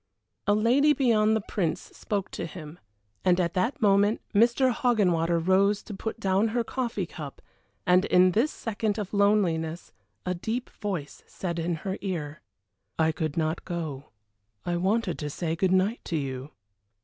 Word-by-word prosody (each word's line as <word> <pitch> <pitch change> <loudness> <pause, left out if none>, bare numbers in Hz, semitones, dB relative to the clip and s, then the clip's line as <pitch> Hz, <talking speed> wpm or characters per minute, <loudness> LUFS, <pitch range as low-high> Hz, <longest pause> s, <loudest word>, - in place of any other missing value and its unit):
A 205 - +4
lady 255 +8 +4
beyond 220 -6 +3
the 220 - 0
Prince 170 -6 -1
spoke 200 -3 -4
to - - -4
him, 160 -1 -10 0.4
and 180 0 +3
at 170 -2 0
that 225 +11 0
moment 205 +1 +4
Mr. 240 +4 +4
Hoggenwater 180 -9 +2
rose 195 +4 +2
to 210 - -8
put 220 +3 -5
down 195 +1 +2
her 235 +2 0
coffee 230 -6 -2
cup, 150 -4 -8 0.5
and 180 +2 +4
in 180 0 +5
this 230 - +2
second 220 -1 -2
of 210 -2 -4
loneliness 180 -6 +1 0.3
a 180 - 0
deep 225 +8 -4
voice 185 -9 -5
said 170 -2 -4
in 170 +1 -1
her 190 0 -2
ear: 155 -7 -4 0.6
"I 160 0 +3
could 155 -1 -3
not 160 0 -1
go 155 -6 -4 0.6
I 175 - 0
wanted 190 +2 0
to 150 - -3
say 160 +2 -2
good 185 +3 +1
night 190 +5 +2
to 170 - -3
you!" 135 -1 -4
190 Hz, 160 wpm, -27 LUFS, 165-215 Hz, 0.6 s, in